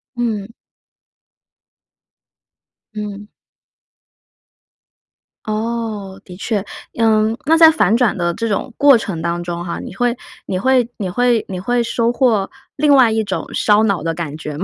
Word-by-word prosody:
嗯。 225 -5 -2 2.5
嗯。 210 -1 -6 2.2
哦， 215 -3 -4
的 180 - -11
确。 210 -2 -2 0.4
嗯， 220 0 +2
那 320 +3 +4
在 325 -1 +8
反 225 - +2
转 240 -4 +2
的 175 -1 0
这 230 +5 -3
种 215 +4 -2
过 285 -3 +6
程 195 -7 -5
当 170 +1 -2
中 175 0 -4
哈， 170 -1 -5
你 - - -8
会 245 +2 0 0.3
你 185 - -2
会 255 +1 +2
你 195 -4 -3
会 240 +3 +1
你 185 -1 -5
会 240 +6 0
收 235 0 0
获 235 -6 +1 0.3
另 290 0 +3
外 255 -4 +6
一 220 0 0
种 195 -2 -3
烧 210 0 +3
脑 200 -4 +1
的 165 0 -1
感 160 -3 -5
觉 150 -2 -6
吗？ 175 - -3
215 Hz, 155 characters per minute, -18 LUFS, 190-240 Hz, 2.5 s, 在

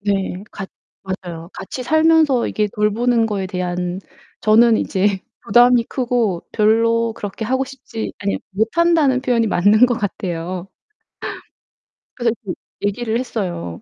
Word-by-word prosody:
네. 195 -2 -1
같 195 -2 -7 0.4
맞아요. 175 -3 -6
같이 255 +6 -6
살면서 315 -2 +3
이게 210 -1 0
돌보는 225 +3 +2
거에 200 -3 -2
대한 180 0 -3 0.4
저는 225 +1 +5
이제 195 -1 +1 0.3
부담이 240 +2 +5
크고 235 -9 -1
별로 230 +1 +2
그렇게 205 +1 -5
하고 260 +4 0
싶지 255 -4 -7
아니 200 -1 -1
못한다는 270 - +2
표현이 240 -3 +1
맞는 205 +6 +5
것 245 - 0
같아요. 185 -3 -4 1.5
그래서 240 -2 0
그 185 - -4 0.3
얘기를 220 +3 -1
했어요. 180 - -4
220 Hz, 270 characters per minute, -19 LUFS, 190-245 Hz, 1.5 s, 저는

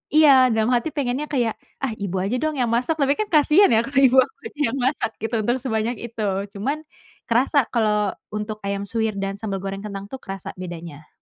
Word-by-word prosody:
Iya, 270 -5 +7
dalam 220 -1 +1
hati 245 +6 -1
pengennya 270 -1 -1
kayak, 240 -5 +1 0.2
"Ah, 260 -5 -2
Ibu 200 -3 -4
aja 200 +6 -1
dong, 305 +2 -1
yang 245 - +2
masak." 250 +8 0
Tapi 280 0 +3
kan, 430 - -2
kasihan 310 +5 +5
ya, 225 - +5
kalau 270 +4 +1
ibu 260 +1 +2
aku 260 +12 +2
aja 450 -10 -10
yang 265 - -3
masak 260 -4 0
gitu, 225 +1 -1
untuk 240 +3 +1
sebanyak 225 -1 -1
itu. 230 -3 -3 0.2
Cuman, 245 +10 -2 0.5
kerasa 260 +4 +3
kalau 210 -3 +2 0.2
untuk 210 0 -5
ayam 200 0 -2
suwir 220 +1 -1
dan 195 0 -3
sambal 195 -3 -4
goreng 195 0 -4
kentang 200 -1 -7
tuh, 265 - -6
kerasa 195 -6 -7
bedanya. 170 -4 -8
230 Hz, 205 wpm, -23 LUFS, 200-270 Hz, 0.5 s, Iya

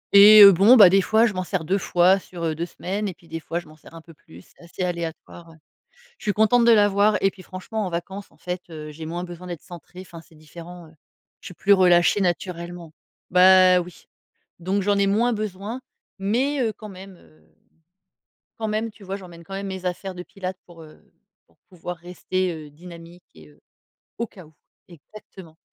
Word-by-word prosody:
et 210 +1 +10
heu, 200 - +11
bon, 200 +7 +6
bah 195 -4 +9
des 195 +1 +4
fois, 220 +4 +3
je 220 - -1
m'en 185 0 -3
sers 180 -2 -3
2 190 +5 0
fois 180 +2 +3
sur, 175 -2 -10
heu, 160 -1 -1
2 170 +3 -5
semaines 200 +5 -4
et 185 - -6
puis 170 - -23
des 165 0 -6
fois, 165 +2 -4
je 175 - -14
m'en 155 - -16
sers 160 +2 -17
un 165 - -11
peu 165 0 -17
plus, 90 - -17
c'est - - -25
assez 170 +2 -6
aléatoire, 170 -1 -6
ouais. 160 - -16 0.6
Je - - -15
suis 210 - +1
contente 220 +3 +3
de 235 - +6
l'avoir 205 0 +3
et 195 - +3
puis 185 -1 -15
franchement, 200 +3 -5
en - - -3
vacances, 190 +4 -7
en - - -24
fait, 180 0 -5
heu, 155 -2 -9
j'ai 155 +1 -9
moins 175 +2 -5
besoin 175 0 -9
d'être 175 -3 -7
centrée, 175 +1 -12
enfin, 175 -3 -12
c'est 165 - -22
différent, 170 +2 -13
heu. - - -20 0.5
Je - - -14
suis 180 - -12
plus 200 +4 +2
relâchée 180 0 +4
naturellement. 175 -2 -4 0.4
Bah 185 0 +6
oui! 180 0 -8 0.5
Donc 195 +3 -1
j'en 205 +1 +1
ai 200 0 +2
moins 230 +5 +1
besoin, 215 +2 -5 0.4
mais, 255 +9 0
heu, 225 -2 -1
quand 215 0 -12
même, 190 -1 -12
heu, 80 - -24 1.2
quand 220 - -3
même, 215 +1 -2
tu 205 - -18
vois? 195 0 -5
J'emmène 175 -4 -12
quand 195 +4 -9
même 200 - -5
mes 190 -1 -7
affaires 185 +1 -4
de 180 - -8
pilates 185 0 -7
pour, 165 -2 -14
heu, 155 - -17 0.5
pour 85 - -33
pouvoir 180 -1 -8
rester, 180 +1 -3
heu, 155 -2 -10
dynamique 170 +2 -14
et 80 -2 -16
heu, 75 - -24 0.6
au 235 - -3
cas 185 -6 -15
où. 155 - -23 0.3
Exactement. 170 -1 -15
180 Hz, 215 wpm, -23 LUFS, 170-200 Hz, 1.2 s, heu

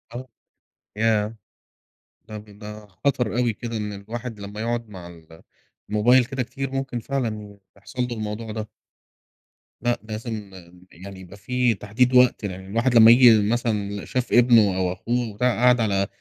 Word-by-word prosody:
آه، 130 +1 -7 0.7
ياه! 110 0 +1 0.9
طَب 105 -1 -9
ده 105 0 -10
خطر 120 +3 -1
أوي 120 -3 +1
كده 115 +1 -6
إن 105 -1 -4
الواحد 110 +3 -7
لمّا 100 +1 -7
يقعد 115 -1 -3
مع 90 -4 -10
ال 80 -1 -15 0.5
الموبايل 120 +4 +4
كده 135 0 -3
كتير، 135 +3 -6
ممكن 135 -2 -3
فعلًا 115 -3 -3
ي 100 -1 -14 0.2
يحصل 125 +6 -6
لُه 125 -1 -4
الموضوع 110 +1 -5
ده. 110 -1 -6 1.1
لأ، 120 +1 0
لازم 110 -2 -6 0.4
يعني 95 +2 -11
يبقى 95 +2 -12
في 125 +3 0
تحديد 115 +5 0
وقت 125 -3 +4
لأن 95 -1 -6
الواحد 115 +6 0
لمّا 115 0 +9
ييجي 115 -4 +6
مثلًا 110 -4 -1
ل - - -11
شاف 125 -1 -2
ابنُه 115 -6 +5
أو 90 -1 0
أخوه 120 +4 -2
وبتاع 125 +5 0
قاعد 125 +1 +4
على 100 -3 0
110 Hz, 160 wpm, -23 LUFS, 105-120 Hz, 1.1 s, لمّا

